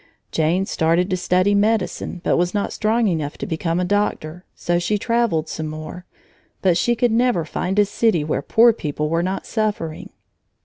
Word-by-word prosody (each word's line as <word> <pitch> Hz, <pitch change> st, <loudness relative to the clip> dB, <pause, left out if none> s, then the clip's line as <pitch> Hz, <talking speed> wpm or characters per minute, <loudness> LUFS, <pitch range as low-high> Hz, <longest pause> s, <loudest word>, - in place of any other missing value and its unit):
Jane 165 Hz, +4 st, +1 dB
started 170 Hz, +2 st, +1 dB
to -, -, +2 dB
study 185 Hz, +2 st, +2 dB
medicine 205 Hz, -3 st, 0 dB
but -, -, +2 dB
was 175 Hz, +3 st, 0 dB
not 205 Hz, -, -1 dB
strong 225 Hz, +1 st, +1 dB
enough 155 Hz, -6 st, -2 dB
to -, -, -5 dB
become 165 Hz, +1 st, -2 dB
a 180 Hz, -, 0 dB
doctor. 180 Hz, -4 st, -2 dB
So 175 Hz, 0 st, 0 dB
she 210 Hz, +4 st, 0 dB
traveled 230 Hz, -8 st, 0 dB
some 155 Hz, 0 st, -4 dB
more, 155 Hz, +4 st, -8 dB, 0.6 s
but 185 Hz, -3 st, +4 dB
she 240 Hz, +7 st, +1 dB
could 240 Hz, 0 st, +1 dB
never 235 Hz, -7 st, +2 dB
find 185 Hz, +5 st, -3 dB
a 205 Hz, -, +5 dB
city 200 Hz, -5 st, +1 dB
where 150 Hz, -2 st, -1 dB
poor 230 Hz, +9 st, +5 dB
people 150 Hz, -6 st, -3 dB
were 165 Hz, +1 st, +1 dB
not 185 Hz, +2 st, -3 dB
suffering. 210 Hz, -8 st, -3 dB
180 Hz, 180 wpm, -21 LUFS, 165-215 Hz, 0.6 s, a